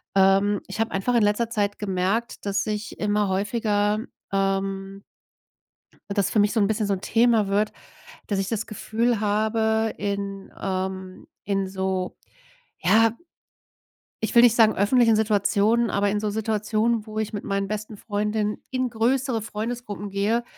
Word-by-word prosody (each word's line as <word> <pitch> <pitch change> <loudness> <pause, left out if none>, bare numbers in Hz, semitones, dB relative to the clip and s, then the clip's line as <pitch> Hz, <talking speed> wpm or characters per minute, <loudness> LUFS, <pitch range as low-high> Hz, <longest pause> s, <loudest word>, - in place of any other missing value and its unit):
Ähm, 195 +1 +4
ich 195 +3 -7
habe 225 0 0
einfach 215 +6 0
in 230 - +4
letzter 210 +3 +1
Zeit 205 -3 -1
gemerkt, 200 +4 -1
dass 200 0 0
ich 210 0 -4
immer 210 0 +1
häufiger, 210 +1 0 0.3
ähm 195 0 -1 1.1
das 200 -1 +1
für 215 - +1
mich 205 0 +3
so 225 - +1
'n 200 - +3
bisschen 215 -1 0
so 200 - +1
'n 190 - -4
Thema 225 -3 +3
wird, 205 +2 +1 0.6
dass 200 - -1
ich 195 0 -1
das 225 -1 -2
Gefühl 225 +1 -1
habe, 220 +1 +1
in, 200 -1 -4
ähm 190 -1 -4 0.2
in 195 -1 0
so 190 -1 -2 0.6
ja, 225 0 +4 1.1
ich 220 - -2
will 235 - +8
nicht 240 -2 +6
sagen 220 -2 +5
öffentlichen 225 +2 +4
Situationen, 215 +2 +2
aber 200 0 +1
in 205 +1 -1
so 215 - -1
Situationen, 220 +1 0
wo 215 0 -6
ich 220 0 -2
mit 205 - -4
meinen 195 0 -1
besten 215 0 -5
Freundinnen 210 0 -1
in 255 -1 -1
größere 240 +1 +1
Freundesgruppen 215 -2 -5
gehe, 210 +5 0
210 Hz, 155 wpm, -24 LUFS, 200-225 Hz, 1.1 s, will